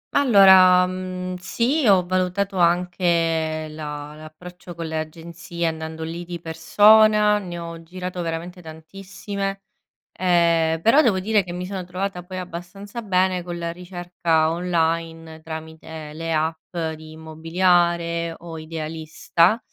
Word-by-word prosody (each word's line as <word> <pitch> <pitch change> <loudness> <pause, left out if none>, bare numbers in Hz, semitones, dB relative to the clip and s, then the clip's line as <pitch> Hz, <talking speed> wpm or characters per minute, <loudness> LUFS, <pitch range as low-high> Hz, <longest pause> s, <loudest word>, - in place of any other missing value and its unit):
Allora, 190 -8 +7
uhm, 185 0 -4
sì, 240 - 0
ho 190 -3 +5
valutato 185 +2 -1
anche 170 -2 +1
la 150 -1 -7
l'approccio 175 +3 -12
con 165 0 -5
le 160 0 -3
agenzie 170 +2 -6
andando 160 0 -4
lì 165 +2 -5
di 175 0 -7
persona, 210 +6 +4
ne 175 -3 -7
ho 170 -1 -7
girato 180 +1 -6
veramente 170 +2 -5
tantissime, 195 +4 -6 0.5
ehm, 170 -3 +2
però 250 - +5
devo 210 -9 +2
dire 205 +1 +1
che 175 - -8
mi 180 +1 -5
sono 190 0 -5
trovata 180 +1 -4
poi 185 +1 -8
abbastanza 185 +5 -7
bene 185 -3 +1
con 175 0 -6
la 170 0 -3
ricerca 175 -2 -1
online, 165 -2 -2
tramite 160 -1 -8
le 165 +1 -5
app 160 +2 -2 0.2
di 155 0 -12
Immobiliare 170 +1 0
o 165 -1 -9
Idealista, 160 +4 0
175 Hz, 130 wpm, -22 LUFS, 160-185 Hz, 0.5 s, Allora